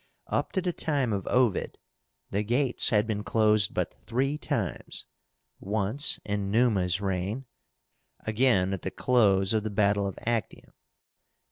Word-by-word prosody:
Up - - -2
to 190 - 0
the 180 -1 -1
time 140 -9 -1
of 100 -2 -3
Ovid 125 -5 +1 0.5
the 100 - 0
gates 125 +4 +2
had 105 -1 +2
been 105 -2 -3
closed 110 -2 +2
but - - -1
three 135 +5 -1
times, 130 - -3 0.5
once 105 +7 +1
in 100 -1 -2
Numa's 100 -5 +2
reign, 100 +6 -3 0.8
again 110 -4 +2
at 95 - -4
the - - -3
close 100 -6 +2
of 110 - +2
the 110 - -4
battle 100 -1 +1
of 95 - -6
Actium. 115 -1 -3
110 Hz, 140 wpm, -27 LUFS, 100-125 Hz, 0.8 s, gates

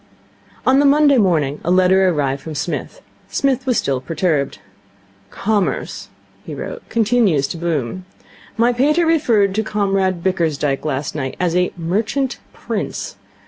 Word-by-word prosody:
On 265 +1 +5
the 290 - +4
Monday 285 -2 +5
morning 155 -8 +1
a - - -2
letter 185 +1 +4
arrived 140 -4 -1
from 160 -1 -7
Psmith. 170 - -4 0.2
Psmith 270 -1 0
was 250 - +2
still 135 -2 0
perturbed. 155 -3 -1 0.7
'Commerce,' 205 - -2 0.4
he - - -7
wrote, - - -6
'continues 220 - +2
to - - -5
boom. 165 0 -2 0.5
My 235 +2 +3
pater 300 +7 +2
referred 235 -12 +2
to 215 - +1
Comrade 195 -4 0
Bickersdyke 155 -7 0
last 140 -1 -2
night 135 -4 -4
as 175 -2 0
a 180 0 +2
Merchant 215 +10 -1
Prince. - - -4
185 Hz, 140 wpm, -19 LUFS, 155-235 Hz, 0.7 s, On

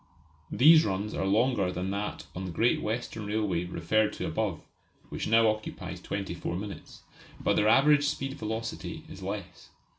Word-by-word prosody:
These 155 +4 +7
runs 100 +2 -2
are 95 - -1
longer 105 -2 +2
than 90 +1 -3
that 100 +1 -4
on 95 +1 -4
the 90 - -4
Great 115 +8 +2
Western 110 -1 -3
Railway 105 -5 0
referred 90 +5 +1
to - - -4
above - - -2 0.5
(which - - -4
now 115 +1 +5
occupies 110 0 -3
twenty 100 -3 -4
four 85 0 -4
minutes), 100 +2 -8 0.4
but - - +1
their 105 - +3
average 145 +4 +5
velocity 115 -4 -5
is - - -10
less. - - -6
105 Hz, 155 wpm, -29 LUFS, 95-115 Hz, 0.5 s, These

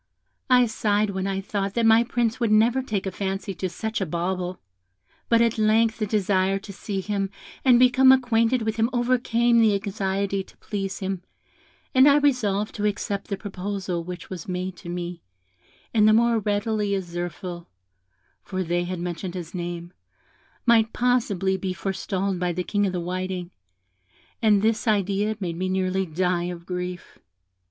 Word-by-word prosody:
I 250 -1 +6
sighed 215 -2 +1
when 190 0 -2
I 195 0 -1
thought 200 0 -3
that 235 -1 +2
my 225 +1 +6
Prince 235 -1 -1
would 230 -3 +1
never 230 +5 +4
take 210 -7 -3
a 190 - -2
fancy 195 +1 -3
to 185 0 -3
such 220 +5 -3
a - - +1
bauble; 180 +2 -2 0.7
but 230 0 +5
at 230 -1 0
length 220 +1 +3
the 215 - 0
desire 195 -2 +1
to 200 0 -9
see 195 0 -4
him 200 0 -2 0.3
and 255 -2 +6
become 255 +1 +6
acquainted 245 -2 +3
with 220 0 -2
him 225 +1 +2
overcame 240 -1 +2
the 220 -3 +4
anxiety 195 -1 -1
to - - -21
please 195 -2 -4
him, 190 -1 -3 0.7
and 260 +2 +7
I 285 0 +6
resolved 220 -8 +1
to 210 - -2
accept 200 -1 -3
the 200 - -3
proposal 190 -3 -4
which 180 0 -7
was 180 -4 -7
made 185 0 -3
to 170 - -10
me, 175 0 -5 0.7
and 215 -2 +5
the 215 - +6
more 230 0 +4
readily 205 0 0
as 190 -2 -3
Zirphil 175 0 -6 0.7
(for 185 -1 -3
they 175 +1 0
had 180 +1 -4
mentioned 175 +1 -4
his 170 -3 -6
name) 175 -1 -5 0.7
might 225 -2 +4
possibly 210 -7 +1
be 190 -1 -3
forestalled 190 0 -2
by 180 -1 0
the 180 +2 -2
King 205 +2 0
of 185 - -3
the 180 - -1
Whiting, 185 0 -4 0.9
and 210 -3 +4
this 225 +1 +1
idea 205 0 +1
made 170 -4 -3
me 185 +1 -1
nearly 190 0 0
die 175 +1 0
of 175 -1 -6
grief. 180 0 -5
195 Hz, 170 wpm, -24 LUFS, 185-220 Hz, 0.9 s, and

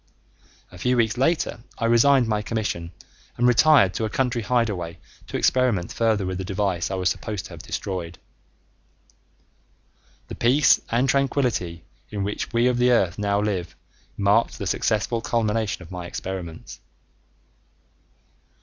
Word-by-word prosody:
A 90 - -12
few 125 +4 +1
weeks 115 -1 +2
later 145 +1 0 0.2
I 115 - -1
resigned 120 +2 +4
my 105 -1 0
commission 105 -7 -3 0.5
and 120 - +3
retired 125 -5 +5
to - - -3
a 110 - -1
country 125 0 0
hideaway 105 -7 -1 0.3
to - - -3
experiment 120 -9 +1
further 110 -4 +1
with 95 0 -3
the - - -3
device 95 -2 -1
I 95 - -2
was 90 -1 -1
supposed 105 +1 -3
to - - -10
have 80 - -9
destroyed. 90 -3 -5 2.1
The - - -8
peace 135 +5 +4
and 120 +3 +1
tranquility 125 - 0 0.3
in 100 -2 -3
which 105 +1 -3
we 120 0 +2
of 125 -1 +2
the 125 0 +4
earth 100 -7 +2
now 100 0 +1
live 95 -5 -2 0.4
marked 105 +3 +2
the - - -5
successful 110 +2 0
culmination 110 -4 -1
of 85 - -14
my 90 -1 -6
experiments. 90 -3 -7
105 Hz, 145 wpm, -24 LUFS, 95-120 Hz, 2.1 s, retired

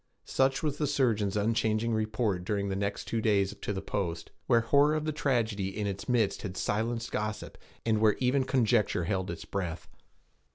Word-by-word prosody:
Such 135 +2 +1
was 145 -2 -1
the 150 - +1
surgeon's 110 -8 +1
unchanging 110 +1 +1
report 110 -3 0
during 100 0 -1
the 95 - -1
next 100 +1 -2
two 115 - -1
days 100 -3 +2
to - - -5
the 95 -1 -4
post, 85 -6 -3 0.2
where 115 -1 +5
horror 140 +6 +4
of 155 0 -2
the 155 - 0
tragedy 110 -9 -1
in 105 - -1
its 100 +2 -4
midst 115 -5 +2
had 95 -3 -6
silenced 115 +2 -1
gossip, 105 0 -3 0.3
and 110 -2 +2
where 110 -2 +5
even 130 +1 +2
conjecture 115 -8 +2
held 95 +1 -1
its 80 -1 -6
breath. 85 -1 -4
110 Hz, 180 wpm, -29 LUFS, 100-120 Hz, 0.3 s, where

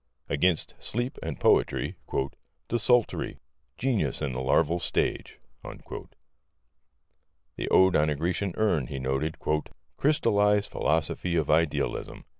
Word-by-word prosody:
Against 85 +3 +1
Sleep 120 +3 -2
and - - -5
Poetry: - - +2 0.7
"Desultory. 120 +1 +1 0.4
Genius 115 - 0
in 70 -4 -2
the 65 - -3
larval 80 +6 +2
state." - - -1 0.3
The - - -8 1.6
Ode 95 -1 +5
on 75 +1 +3
a 75 - 0
Grecian 90 +4 -2
Urn, 90 - +1
he - - -5
noted: 65 +4 -2 0.6
"Crystallized 105 -8 +2
philosophy 80 +3 0
of 80 -4 +1
idealism. 80 -1 0
85 Hz, 105 wpm, -27 LUFS, 75-105 Hz, 1.6 s, Ode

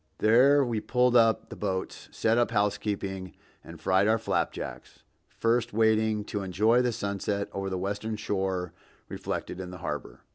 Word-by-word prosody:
There 135 +6 +5
we 115 -3 -1
pulled 125 +2 +2
up 115 -2 +4
the - - -8
boats, 95 -2 -4
set 115 +1 +1
up 120 - +2
housekeeping 100 -3 -2 0.3
and - - -11
fried 95 +2 +2
our 110 +1 +4
flapjacks, 115 - -4 0.3
first 115 +1 0
waiting 110 -1 +2
to 105 0 -4
enjoy 105 +6 +3
the 125 -1 +1
sunset 100 -2 -2
over 95 0 -3
the 95 - -2
western 100 +4 -3
shore 95 -4 -2 0.4
reflected 90 - -5
in 90 -1 -6
the 90 - -8
harbor. - - -6
105 Hz, 155 wpm, -28 LUFS, 95-115 Hz, 0.4 s, There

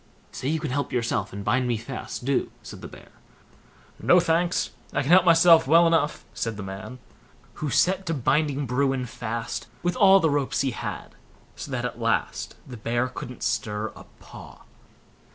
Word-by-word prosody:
"Say 130 - -5
you 160 +2 0
can 150 -4 -4
help 140 +2 -2
yourself, 115 -4 -1
and 100 +1 -7
bind 125 +4 +1
me 120 -2 0
fast, 120 +1 -7
do", 135 -1 0
said - - -10
the - - -7
Bear. - - -14 0.9
"No, 180 - +5
thanks, 170 +1 +1 0.2
I - - 0
can 140 - -1
help 180 0 +7
myself 165 -2 +6
well 165 +4 +6
enough", 165 -3 +1
said 115 -2 -3
the 100 - -6
man, 95 +6 -7 0.6
who 150 - -1
set 190 +5 +2
to 165 - 0
binding 145 +1 +1
Bruin 135 +1 0
fast 115 -1 -5 0.2
with 175 0 0
all 195 -4 +6
the 160 -4 +2
ropes 140 -2 0
he 135 -1 0
had, - - -6 0.4
so - - -8
that - - -2
at - - -5
last - - -1
the 125 -2 -9
bear 120 +3 -1
couldn't 125 0 -8
stir 105 0 -2
a - - -12
paw. - - -13
135 Hz, 180 wpm, -25 LUFS, 120-165 Hz, 0.9 s, help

